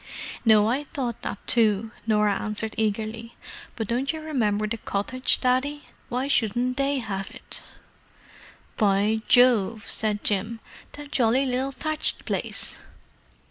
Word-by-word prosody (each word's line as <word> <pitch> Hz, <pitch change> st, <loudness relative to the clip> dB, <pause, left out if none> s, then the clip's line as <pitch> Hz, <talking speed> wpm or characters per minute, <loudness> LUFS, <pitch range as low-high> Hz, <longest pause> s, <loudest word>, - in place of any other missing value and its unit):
"No, 215 Hz, -2 st, +5 dB
I 260 Hz, +6 st, 0 dB
thought 250 Hz, -5 st, -4 dB
that -, -, -4 dB
too," 220 Hz, -2 st, +2 dB, 0.2 s
Norah 210 Hz, -2 st, +2 dB
answered 215 Hz, +1 st, -2 dB
eagerly. 220 Hz, +2 st, -2 dB, 0.4 s
"But 225 Hz, -3 st, -3 dB
don't 250 Hz, +4 st, 0 dB
you 320 Hz, -, -6 dB
remember 225 Hz, -10 st, 0 dB
the 220 Hz, +2 st, -3 dB
cottage, 225 Hz, +5 st, 0 dB
Daddy? 265 Hz, +4 st, 0 dB, 0.3 s
Why 255 Hz, +2 st, -1 dB
shouldn't 245 Hz, 0 st, +1 dB
they 275 Hz, 0 st, +1 dB
have 195 Hz, -5 st, -4 dB
it?" -, -, -3 dB, 1.2 s
"By 210 Hz, +2 st, +2 dB
Jove!" 230 Hz, -4 st, +4 dB
said 210 Hz, -1 st, 0 dB
Jim. 215 Hz, +3 st, 0 dB, 0.3 s
"That 290 Hz, 0 st, -10 dB
jolly 250 Hz, +2 st, +2 dB
little 260 Hz, +1 st, -1 dB
thatched 310 Hz, +3 st, +1 dB
place?" -, -, -1 dB
230 Hz, 130 wpm, -25 LUFS, 215-255 Hz, 1.2 s, No